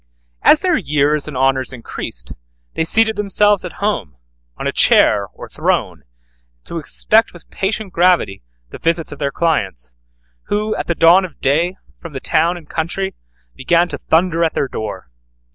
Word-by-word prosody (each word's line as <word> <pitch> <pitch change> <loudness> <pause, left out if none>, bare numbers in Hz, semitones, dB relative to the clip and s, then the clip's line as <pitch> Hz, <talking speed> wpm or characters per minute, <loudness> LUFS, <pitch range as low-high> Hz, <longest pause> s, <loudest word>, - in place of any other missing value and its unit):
As 305 - +5
their 360 -3 +2
years 150 - +1
and 150 -4 -6
honors 130 0 +1
increased, 120 -3 -5 0.4
they - - -1
seated 220 +5 +4
themselves 205 0 +2
at 180 - -7
home 205 - -3 0.4
on - - -6
a - - 0
chair 100 -2 +4
or - - -12
throne, - - -2 0.6
to 170 - -6
expect 215 +8 +2
with 175 - -15
patient 200 0 -3
gravity 175 - +2 0.3
the - - -9
visits 165 0 -1
of 145 - -9
their 140 -2 -1
clients, 95 - -2 0.5
who 215 +1 -1
at - - -4
the 170 - -1
dawn 170 +4 +5
of 180 -5 -9
day, 165 +7 +1 0.2
from 165 -3 -10
the 135 - -5
town 165 +6 +1
and 165 -3 -14
country, 180 +5 -3 0.4
began 170 +6 +2
to - - -6
thunder 170 0 +1
at 165 - 0
their 140 - 0
door. 110 - -7
165 Hz, 165 wpm, -17 LUFS, 140-190 Hz, 0.6 s, As